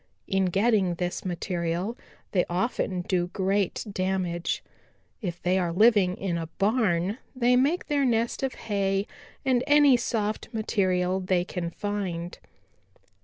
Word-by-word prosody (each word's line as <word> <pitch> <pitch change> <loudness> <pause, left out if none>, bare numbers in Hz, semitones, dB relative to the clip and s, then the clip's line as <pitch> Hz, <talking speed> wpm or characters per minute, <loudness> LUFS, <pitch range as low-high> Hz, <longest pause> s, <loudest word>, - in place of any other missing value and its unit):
In 190 -1 +1
getting 195 -1 +2
this 180 +1 -3
material 175 +3 -2 0.4
they 180 -3 +3
often 185 -1 -1
do 175 0 0
great 195 +2 -1
damage. 185 -3 -1 0.6
If 175 -4 -4
they 185 +1 +2
are 175 -2 0
living 200 -1 +4
in 175 -3 -2
a 165 - -4
barn, 200 -1 +1 0.2
they 250 0 +3
make 285 +8 +2
their 290 -2 +1
nest 235 -2 +1
of 265 -1 -2
hay 195 -2 -1 0.4
and 255 -2 +2
any 290 -3 +6
soft 215 -3 -2
material 185 -4 0
they 185 -1 +1
can 180 -3 -4
find. 180 -3 -4
195 Hz, 130 wpm, -27 LUFS, 180-225 Hz, 0.6 s, any